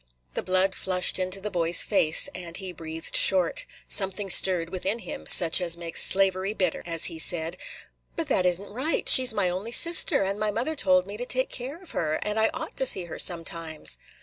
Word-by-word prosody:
The - - -4
blood 185 +1 -1
flushed 185 0 0
into 185 +1 -3
the 210 +2 -7
boy's 170 -1 +2
face, 160 -6 +1
and 175 -2 -8
he 190 -2 -7
breathed 160 -1 -6
short. - - +2 0.2
Something 195 0 +2
stirred 175 -3 +4
within 190 +3 -4
him, 235 - -10
such 170 0 +5
as 170 -1 +2
makes 170 -1 -1
slavery 195 +1 0
bitter, 180 -5 -2
as 165 -1 +2
he 160 - -3
said, 165 0 0 0.6
"But 330 -2 -3
that 225 -10 0
is 180 0 0
n't 200 - -13
right. 265 +9 -3
She 260 - +8
's - - +5
my 200 -4 -2
only 185 +6 -6
sister, 335 - +3
and 195 +2 -5
my 215 0 -2
mother 245 +9 -4
told 185 -8 0
me 200 +2 -9
to 245 - -6
take 255 +1 -2
care 265 +6 -7
of 370 - -14
her; 155 -1 -3
and 210 +1 -3
I 220 - +2
ought - - -8
to 265 - +2
see 190 - +4
her 170 - -9
sometimes." 165 - -2
190 Hz, 210 wpm, -24 LUFS, 170-215 Hz, 0.6 s, She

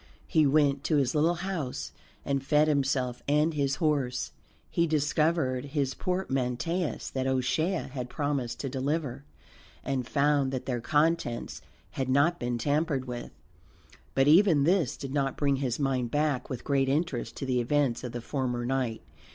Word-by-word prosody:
He 155 -2 +3
went 140 -1 +3
to 155 - +2
his 135 -3 +1
little 160 +3 +3
house 175 -7 -4 0.3
and 140 -1 0
fed 150 +2 +3
himself 135 -4 0
and 150 +3 +3
his 140 -2 0
horse. 140 -5 0 0.4
He 170 0 +2
discovered 150 -3 +1
his 135 -2 +1
portmanteaus 165 -1 -2
that 130 0 -1
O'Shea 130 +8 0
had 125 -3 -4
promised 140 -6 -2
to 140 - -3
deliver, 135 0 -2 0.6
and 130 -3 -2
found 140 -1 +2
that 130 -1 -4
their 125 -2 -2
contents 145 -3 0 0.3
had 130 -1 -3
not 145 +6 +3
been 120 0 -1
tampered 145 +1 0
with; 120 -1 -6 0.9
but 135 +1 +4
even 165 -2 +6
this 170 -4 +2
did 135 -1 -6
not 135 -2 0
bring 140 -2 +2
his 130 -3 -1
mind 130 -4 0
back 145 -2 0
with 125 -3 -5
great 135 -2 +1
interest 145 -3 -1
to 135 - -4
the 125 -2 +1
events 135 -1 +1
of 125 - -4
the 120 0 -5
former 125 -2 -2
night. 125 -3 -1
140 Hz, 160 wpm, -28 LUFS, 130-150 Hz, 0.9 s, even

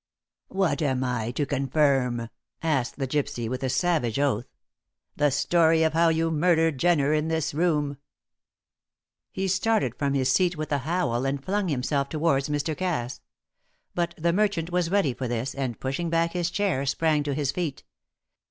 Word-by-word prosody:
"What 190 -4 0
am 130 -3 0
I 125 -3 -1
to 145 - 0
confirm?" 135 -4 +1 0.3
asked 140 -6 0
the 135 -2 -2
gypsy, 130 -4 -2
with 125 +2 -3
a 130 - -1
savage 150 -7 +1
oath. 135 -5 0 0.7
"The 145 - +3
story 160 +3 +3
of 160 -1 +2
how 165 +1 +4
you 165 0 +1
murdered 160 -2 +2
Jenner 155 -4 +3
in 155 +1 +1
this 160 -3 -1
room!" 150 -3 0 1.3
He 190 0 -2
started 190 - +1
from 140 +1 -1
his 130 -1 +2
seat 180 0 +2
with 155 0 -4
a 145 - +2
howl, 140 -5 -1
and 135 0 -2
flung 200 0 0
himself 140 -1 -1
towards 150 -3 +1
Mr. 150 +1 -1
Cass. 155 -9 -3 0.7
But 170 -1 -1
the 170 +1 +1
merchant 195 -4 0
was 175 -1 +1
ready 190 -9 +2
for 130 +1 -4
this, 120 +3 -2
and 130 -4 -3
pushing 135 +6 -2
back 165 0 +1
his 175 -1 0
chair 190 -8 0
sprang 155 +2 +2
to 145 -1 -2
his 140 -2 0
feet. 155 -5 -4
150 Hz, 170 wpm, -26 LUFS, 135-170 Hz, 1.3 s, how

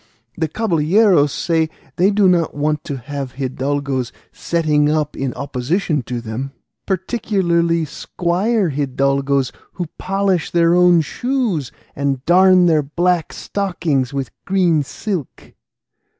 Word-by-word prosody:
The 160 - -1
caballeros 170 -3 +3
say 160 -2 0 0.3
they 185 +3 +4
do 205 -1 +3
not 175 -3 +2
want 150 0 -1
to 140 - -4
have 135 0 -6
hidalgos 135 -1 -2 0.2
setting 150 -3 +1
up 150 -1 0
in 135 -1 -2
opposition 145 +4 -1
to 125 -1 -2
them, 120 +4 -5 0.3
particularly 175 -4 0
squire 180 +6 -1
hidalgos 140 -1 0 0.2
who 180 - -3
polish 195 -2 0
their 170 0 +3
own 175 -1 +5
shoes 220 - -2 0.2
and 140 -2 -2
darn 185 +1 +6
their 160 -3 +4
black 170 +3 0
stockings 165 -9 -2
with 140 -2 -4
green 180 -5 +2
silk." 170 - -6
160 Hz, 120 wpm, -19 LUFS, 140-180 Hz, 0.3 s, darn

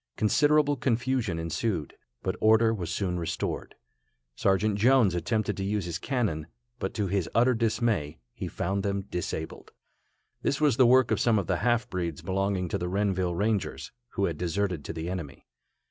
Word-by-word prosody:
Considerable 145 +6 +3
confusion 120 -6 0
ensued, 85 - -2 0.3
but - - -1
order 110 +1 +5
was 90 -6 -4
soon 90 -1 -1
restored. 85 - -3 0.6
Sergeant 100 - +2
Jones 120 -4 +5
attempted 100 +5 -1
to 95 - -2
use 100 -1 -1
his 85 -1 -4
cannon, 105 - -1 0.3
but - - -3
to 105 - 0
his 95 -2 -1
utter 125 +2 +5
dismay, 110 -9 0 0.2
he - - -5
found 95 +3 -2
them 100 0 -1
disabled. 80 -2 -4 0.7
This 140 - 0
was 145 -6 +3
the 130 - +6
work 130 0 +5
of - - +2
some 115 -2 +3
of 100 - 0
the 90 -1 0
half 120 +2 +1
breeds 85 -5 -4
belonging 95 -1 0
to - - -1
the 90 +1 -2
Renville 95 -2 0
Rangers, 105 +1 -1 0.2
who - - +1
had - - -3
deserted 90 -2 -1
to - - -4
the 80 0 -5
enemy. 85 -6 -6
100 Hz, 170 wpm, -28 LUFS, 90-115 Hz, 0.7 s, the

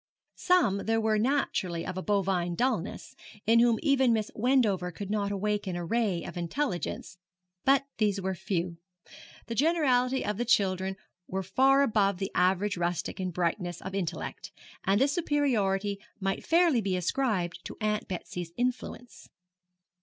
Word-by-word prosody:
Some 235 - +2
there 225 0 +2
were 220 -1 +2
naturally 215 -9 0
of 185 - -4
a 185 - -3
bovine 185 -4 0
dullness, 225 -4 -2 0.3
in 225 +2 +5
whom 235 -1 +4
even 265 -4 +4
Miss 215 -1 -1
Wendover 215 -7 +2
could 200 +3 -6
not 205 -1 0
awaken 205 -2 -1
a 175 -1 -3
ray 205 -3 0
of - - -7
intelligence; 175 - -3 0.5
but 275 +1 +4
these 205 -2 +2
were 190 0 -2
few. 175 -2 -3 0.7
The 230 - -4
generality 265 -3 +2
of 210 -1 -2
the 240 - -1
children 190 -4 +1 0.3
were 190 +1 -3
far 270 +9 +4
above 200 -6 +2
the 195 +1 -3
average 185 +3 +2
rustic 175 +1 -2
in 185 -1 -1
brightness 175 0 -2
of 190 - -7
intellect, 190 -4 -4 0.3
and 195 +2 +2
this 280 +2 +3
superiority 210 - 0 0.2
might 195 0 -2
fairly 330 -7 +3
be 190 -3 -1
ascribed 180 -4 -1
to - - -7
Aunt 215 -1 -1
Betsy's 175 -2 -5
influence. 245 0 -4
205 Hz, 150 wpm, -29 LUFS, 185-245 Hz, 0.7 s, in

